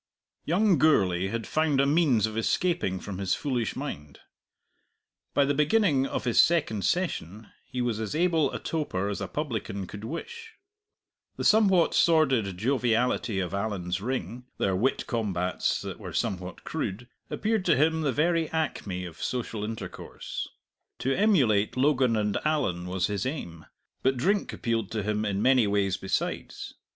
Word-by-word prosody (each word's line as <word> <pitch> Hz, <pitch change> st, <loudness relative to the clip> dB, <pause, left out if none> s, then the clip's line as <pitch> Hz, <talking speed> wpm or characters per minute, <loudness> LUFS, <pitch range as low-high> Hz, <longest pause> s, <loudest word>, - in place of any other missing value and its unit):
Young 185 Hz, 0 st, +3 dB
Gourlay 95 Hz, -, +3 dB
had 115 Hz, +2 st, -3 dB
found 155 Hz, -3 st, +1 dB
a 140 Hz, -, +4 dB
means 140 Hz, -, +3 dB
of 110 Hz, 0 st, -5 dB
escaping 115 Hz, -, 0 dB
from 95 Hz, -1 st, -6 dB
his 95 Hz, -2 st, +1 dB
foolish 125 Hz, -6 st, -2 dB
mind. 75 Hz, -, -6 dB, 1.2 s
By 140 Hz, -, +4 dB
the 145 Hz, -, +1 dB
beginning 150 Hz, -2 st, +3 dB
of -, -, -3 dB
his 120 Hz, -2 st, +5 dB
second 145 Hz, -, +1 dB
session 110 Hz, -, -2 dB, 0.2 s
he 125 Hz, -1 st, -3 dB
was 115 Hz, -3 st, -1 dB
as 110 Hz, +2 st, -3 dB
able 165 Hz, -2 st, +2 dB
a -, -, -3 dB
toper 100 Hz, -, -2 dB
as 105 Hz, -, -4 dB
a 100 Hz, -, -2 dB
publican 110 Hz, -, -3 dB
could 100 Hz, +3 st, -9 dB
wish. 455 Hz, -, -7 dB, 0.8 s
The -, -, -3 dB
somewhat 195 Hz, -6 st, +4 dB
sordid 135 Hz, -, +3 dB
joviality 120 Hz, -2 st, +1 dB
of 90 Hz, -1 st, -3 dB
Allan's 95 Hz, -3 st, -2 dB
ring, 125 Hz, +1 st, -4 dB
their 95 Hz, -1 st, +1 dB
wit 120 Hz, +8 st, 0 dB
combats 95 Hz, -7 st, -1 dB
that -, -, -6 dB
were -, -, -8 dB
somewhat 90 Hz, -1 st, -3 dB
crude, 115 Hz, +6 st, -4 dB, 0.2 s
appeared 220 Hz, -2 st, 0 dB
to 165 Hz, -, +4 dB
him 160 Hz, +3 st, +2 dB
the 145 Hz, -3 st, +1 dB
very 165 Hz, +4 st, +1 dB
acme 100 Hz, -, -2 dB
of 85 Hz, -2 st, -10 dB
social 115 Hz, -4 st, -3 dB
intercourse. 110 Hz, +1 st, -6 dB, 0.5 s
To 135 Hz, -, 0 dB
emulate 130 Hz, -, +3 dB
Logan 130 Hz, -3 st, +3 dB
and 105 Hz, -1 st, 0 dB
Allan 95 Hz, -, 0 dB
was 90 Hz, 0 st, 0 dB
his 100 Hz, +2 st, -2 dB
aim. 85 Hz, -, -6 dB, 0.3 s
But 130 Hz, 0 st, +2 dB
drink 195 Hz, +10 st, +1 dB
appealed 115 Hz, -4 st, -2 dB
to 110 Hz, -2 st, -1 dB
him 105 Hz, +1 st, -1 dB
in 100 Hz, -1 st, -1 dB
many 130 Hz, -4 st, +4 dB
ways 100 Hz, -2 st, +1 dB
besides. 95 Hz, -2 st, -3 dB
120 Hz, 155 wpm, -27 LUFS, 100-155 Hz, 1.2 s, his